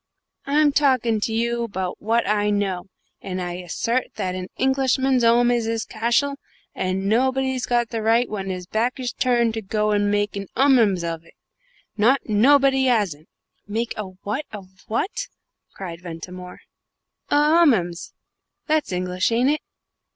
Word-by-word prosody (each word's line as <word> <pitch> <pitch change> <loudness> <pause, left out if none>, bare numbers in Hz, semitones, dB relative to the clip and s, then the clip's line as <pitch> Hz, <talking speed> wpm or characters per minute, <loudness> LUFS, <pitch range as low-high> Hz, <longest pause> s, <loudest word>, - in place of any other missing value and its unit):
"I'm 295 +1 +3
talking 255 -6 +2
to 215 - -2
you 235 +1 0
about 190 -5 -4
what 230 +2 +1
I 210 0 +1
know, 195 -3 -1 0.3
and 185 -1 -5
I 175 -1 -4
assert 230 +8 -2
that 185 -3 -2
an 185 0 -5
Englishman's 265 -1 +2
'ome 240 +1 +4
is 240 -2 +1
his 225 0 -2
cashle, 240 +6 0 0.4
and 185 +1 -2
nobody's 260 +3 +1
got 240 -1 +1
the 225 -2 -3
right 230 +3 +3
when 195 -2 -5
his 180 -1 -4
backsh 245 +6 -2
turned 235 -2 +2
to 225 - -3
go 210 +1 -1
and 205 0 +2
make 205 0 0
a 200 -1 -5
'Ummums 230 -9 +4
of 165 -1 -4
it. 165 - -21 0.6
Not 240 +6 +4
nobody 265 +4 +4
'asn't!" 195 -11 0 0.4
"Make 225 +3 -2
a 215 - -4 0.2
what 240 +9 -3
of 200 -3 -9 0.2
it?" 400 - -2 0.5
cried 175 -3 -7
Ventimore. 180 +1 -9 0.7
"A - - +2
'Ummums 290 - +3 0.5
that's 310 -6 0
English, 180 +2 -1
ain't 245 +4 +3
it? 305 - -1
225 Hz, 150 wpm, -22 LUFS, 190-255 Hz, 0.7 s, ome